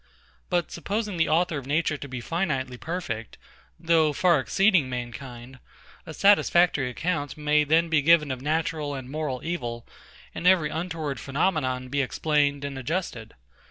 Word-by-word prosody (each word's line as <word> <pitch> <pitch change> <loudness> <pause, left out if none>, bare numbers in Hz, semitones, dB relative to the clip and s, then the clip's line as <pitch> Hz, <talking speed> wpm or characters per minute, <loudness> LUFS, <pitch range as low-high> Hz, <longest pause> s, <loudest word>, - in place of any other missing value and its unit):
But 175 -1 0
supposing 205 +2 -3
the 160 -2 +2
Author 165 -1 +1
of 130 - -11
Nature 155 +1 +1
to 145 - -7
be 125 -2 -6
finitely 135 -8 -2
perfect, 155 - -5 0.4
though 160 -2 +3
far 170 -1 +3
exceeding 190 -2 +2
mankind, 125 +1 -7 0.5
a 160 - -7
satisfactory 175 -8 +4
account 145 +1 -3
may 150 0 +2
then 160 +3 +3
be 160 -2 +2
given 155 -1 +4
of 130 -1 -5
natural 155 -1 -1
and 130 -2 -7
moral 150 -4 -3
evil, 120 -9 -4 0.5
and 175 - -2
every 170 -5 +4
untoward 160 -5 -4
phenomenon 135 -4 -1
be 140 +2 0
explained 145 +1 0
and 140 -1 -5
adjusted. 130 - -4
150 Hz, 150 wpm, -26 LUFS, 130-170 Hz, 0.5 s, satisfactory